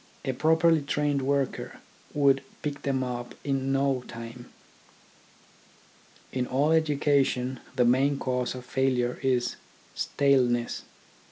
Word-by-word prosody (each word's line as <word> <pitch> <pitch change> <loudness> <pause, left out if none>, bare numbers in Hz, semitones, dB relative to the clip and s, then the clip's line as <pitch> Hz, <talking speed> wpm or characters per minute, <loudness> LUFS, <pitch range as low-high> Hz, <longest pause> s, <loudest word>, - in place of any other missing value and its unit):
A 130 - 0
properly 160 +3 +3
trained 145 0 0
worker 140 0 -1 0.4
would 140 -2 +4 0.2
pick 145 -1 -3
them 135 -2 0
up 120 -1 -5
in 135 -1 -1
no 135 -2 +1
time. 115 +1 -9 1.8
In 125 -1 -1
all 140 +4 +2
education 140 -5 +2 0.2
the 125 -2 +3
main 135 +4 +3
cause 125 -2 -1
of 125 -1 -8
failure 130 -2 0
is 125 -2 0 0.4
staleness. 125 -4 +1
135 Hz, 110 wpm, -27 LUFS, 125-140 Hz, 1.8 s, would